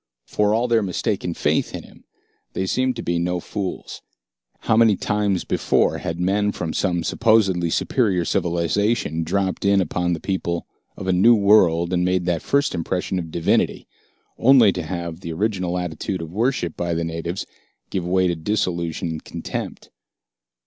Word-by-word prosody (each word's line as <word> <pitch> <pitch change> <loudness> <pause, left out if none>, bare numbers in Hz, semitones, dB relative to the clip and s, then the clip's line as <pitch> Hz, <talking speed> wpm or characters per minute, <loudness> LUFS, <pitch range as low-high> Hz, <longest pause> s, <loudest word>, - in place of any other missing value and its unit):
For 105 0 +1
all 120 +2 +1
their 115 -2 +3
mistaken 95 -2 -2
faith - - 0
in - - -7
him, - - -18 0.5
they 95 - -2
seemed 130 +6 0
to 115 - -5
be 85 -1 0
no 90 +1 -1
fools. 95 +1 -5 0.6
How 115 - +2
many 110 -2 +5
times 105 -2 0
before - - +1
had 85 +1 -4
men 100 +3 +1
from 80 -2 -4
some 85 -3 0
supposedly 100 -6 +2
superior 95 -2 +1
civilization 85 +1 0
dropped 95 +3 -1
in 100 0 +4
upon 90 -1 0
the 80 - -3
people 85 -2 -2 0.3
of - - -6
a 95 - +1
new 115 +7 +6
world 95 -5 +4
and 90 0 +1
made 90 -1 +1
that 85 -2 0
first 140 0 +1
impression 90 +2 -2
of 85 -2 -6
divinity, 85 +1 0 0.5
only 125 -5 +6
to 90 - -4
have 85 0 -5
the 85 -3 -6
original 90 -1 -1
attitude 90 +1 -3
of 80 - -8
worship 110 - 0
by 85 -1 -2
the 85 - -1
natives 85 +2 -4 0.5
give 95 - -2
way 95 +1 +2
to 85 -1 +1
disillusion 85 -1 -2
and 80 -1 -5
contempt? - - -6
90 Hz, 165 wpm, -22 LUFS, 85-105 Hz, 0.6 s, new